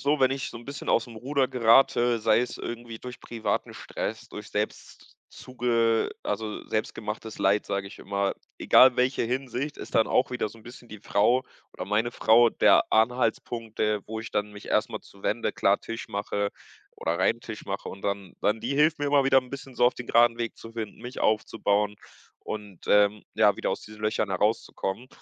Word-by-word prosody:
so, 145 +1 +1
wenn 130 -1 +4
ich 135 0 -2
so - - -9
'n 120 - -11
bisschen 140 +1 -7
aus’m 115 0 +1
Ruder 135 +3 0
gerate, 120 0 +4
sei 110 +1 +4
es 125 - -3
irgendwie 120 -1 -7
durch 125 -1 -9
privaten 115 -2 -3
Stress, 110 +2 -5
durch 105 - -8
selbst 105 +1 -5
zuge 115 -2 0
also, 105 0 -4
„selbstgemachtes 110 0 -4
Leid“, 100 +2 +2
sage 100 0 -2
ich 100 - -11
immer, 100 0 -1 0.2
egal 130 -1 +6
welche 125 0 +1
Hinsicht, 130 +3 -3
ist - - -9
dann 110 - +4
auch 125 - +2
wieder 125 -4 -2
so 115 - -15
'n 110 - -16
bisschen 120 0 -13
die 105 -2 -10
Frau 115 +6 +2 0.3
oder - - -5
meine 110 +4 0
Frau 115 +1 +5
der - - +4
Anhaltspunkt, 115 -1 0
äh, 105 -1 +1
wo 110 0 -5
ich 115 - -8
dann 105 0 -2
mich 105 - -11
erst 105 - +2
mal - - -6
zuwende, 105 +3 -3
klar 100 +1 +2
Tisch 115 0 -7
mache 100 0 -2 0.5
oder 85 +2 -2
reinen 115 +5 +2
Tisch 110 -2 -8
mache 95 0 -4
und 95 - -10
dann 100 -2 -3
dann 105 +2 +1
die 135 +4 -2
hilft 155 +2 +3
mir 145 - -2
immer 140 -1 +4
wieder 135 0 +5
'n 125 - -16
bisschen 135 -2 -8
so - - +3
auf 125 - +5
den 120 - -8
graden 115 0 +4
Weg 115 -1 -3
zu 115 - -11
finden, 110 -2 -5
mich 125 +1 -7
aufzubauen 105 -1 +1 0.4
und, 105 -5 -8
ähm, 105 0 +4
ja, 105 -2 +4
wieder - - -2
aus - - -2
diesen 105 0 -12
Löchern 105 -2 0
herauszukommen. 105 +3 -1
115 Hz, 195 wpm, -27 LUFS, 105-125 Hz, 0.5 s, egal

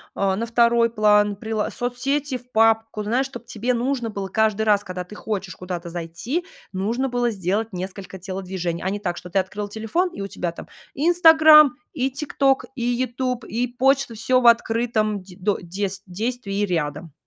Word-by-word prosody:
э, 195 -1 +1
на 230 - -2
второй 235 0 +3
план, 210 -2 +3
прило 220 0 -2
соцсети 260 +3 -2
в 250 +1 -24
папку, 225 -1 +2
знаешь, 245 +6 0
чтоб 240 -3 -10
тебе 235 +2 -2
нужно 245 -1 -1
было 200 -2 -4
каждый 220 +1 +1
раз, 205 -2 +3
когда 180 0 -5
ты 180 - -13
хочешь 195 -5 -4
куда-то 180 -1 -6
зайти, 175 - -4 0.3
нужно 230 +8 -1
было 245 -1 0
сделать 210 +2 -2
несколько 190 +1 -6
телодвижений, 185 -2 -4
а 190 - 0
не 205 +1 -3
так, 175 -3 -3
что 180 - -9
ты 195 - -2
открыла 205 +2 -4
телефон, 225 - -1
и 200 - -8
у 195 - -3
тебя 175 -3 -3
там 170 - -10 0.3
"Инстаграм" 315 -3 +7 0.2
и 265 -2 0
"ТикТок", 275 -1 +1
и 240 - -4
"Ютуб", 245 0 -1
и 240 +3 -1
почта- 265 0 +1
всё 255 +3 +2
в 240 - +4
открытом 225 -3 +2
де 185 -1 -15
до 200 +2 0
дес 190 +2 -4
действии 205 +1 -2
рядом. 155 -3 -3
220 Hz, 175 wpm, -23 LUFS, 190-245 Hz, 0.3 s, Инстаграм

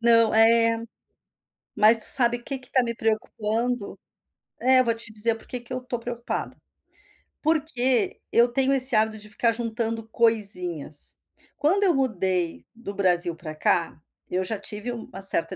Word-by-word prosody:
Não, 230 -2 +4
é. 230 0 +4 0.9
Mas 215 +2 +6
tu - - +5
sabe 240 -2 +3
que 275 +1 -5
que 255 +1 -11
tá 255 - +3
me 235 -1 -3
preocupando? 220 +1 -2 0.6
É, 255 0 +4
vou 230 -2 0
te 230 -1 -5
dizer 220 +2 +4
por 225 - -15
que 250 - -6
que 240 +2 -11
eu 255 - -2
estou 250 -1 -5
preocupada. 235 0 -5 0.9
Porque 305 0 0
eu 235 +1 +4
tenho 270 +2 +1
esse 260 -2 +3
hábito 220 0 +1
de 210 - -9
ficar 230 +3 +1
juntando 230 -1 -4
coisinhas. 180 -10 +2 0.4
Quando 370 +7 +1
eu 370 -3 +3
mudei 190 -10 -1
do 230 -3 -8
Brasil 180 -3 +1
pra 155 -2 -9
cá, 165 +1 0 0.3
eu 185 +1 -1
já 200 +2 -4
tive 210 +4 -5
uma 220 -4 -9
certa 190 -1 +2
230 Hz, 160 wpm, -24 LUFS, 210-245 Hz, 0.9 s, Mas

